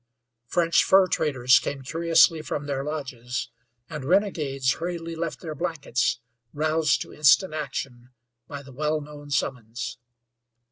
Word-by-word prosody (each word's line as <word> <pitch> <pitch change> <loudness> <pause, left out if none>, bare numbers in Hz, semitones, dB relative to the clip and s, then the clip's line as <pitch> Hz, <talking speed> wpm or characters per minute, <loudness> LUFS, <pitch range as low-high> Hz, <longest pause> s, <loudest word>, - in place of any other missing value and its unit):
French 170 +4 +3
fur 190 0 +6
traders 130 -7 +3
came 140 -1 -5
curiously 165 +2 +3
from 145 -1 -4
their 140 -1 -2
lodges, 130 -5 -4 0.4
and 150 -4 -6
renegades 145 -7 +1
hurriedly 165 -1 -4
left 165 0 -4
their 160 -3 -5
blankets, 155 -8 -1 0.3
roused 155 +1 +1
to - - -14
instant 155 +4 +4
action 135 -4 -5 0.4
by 140 -1 -7
the 135 -1 -13
well 155 +3 0
known 145 0 -11
summons. 125 -3 -3
150 Hz, 130 wpm, -25 LUFS, 135-165 Hz, 0.4 s, fur